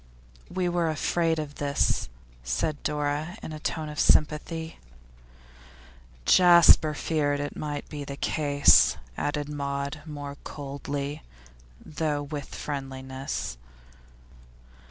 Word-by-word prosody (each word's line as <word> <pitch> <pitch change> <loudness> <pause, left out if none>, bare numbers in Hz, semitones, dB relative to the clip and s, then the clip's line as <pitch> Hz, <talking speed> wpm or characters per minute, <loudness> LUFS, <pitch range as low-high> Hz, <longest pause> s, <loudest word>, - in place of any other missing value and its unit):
'We 180 -1 -1
were 175 -2 +1
afraid 165 +1 +1
of 150 -2 -4
this,' 140 - +1 0.3
said 65 - -1
Dora, 150 +4 -2
in 155 - -6
a 155 - -6
tone 155 0 -3
of 150 0 -6
sympathy. 160 +2 +1 1.5
'Jasper 170 -3 +7
feared 145 -2 0
it 145 0 -4
might 145 -1 -4
be 145 -2 -6
the 140 0 -7
case,' 145 -2 +4 0.2
added 145 - -2
Maud, 140 -1 -3
more 145 -2 -6
coldly, 140 0 -5 0.6
though 150 -1 -2
with 145 -1 -6
friendliness. 130 - -5
145 Hz, 105 wpm, -27 LUFS, 140-155 Hz, 1.5 s, Jasper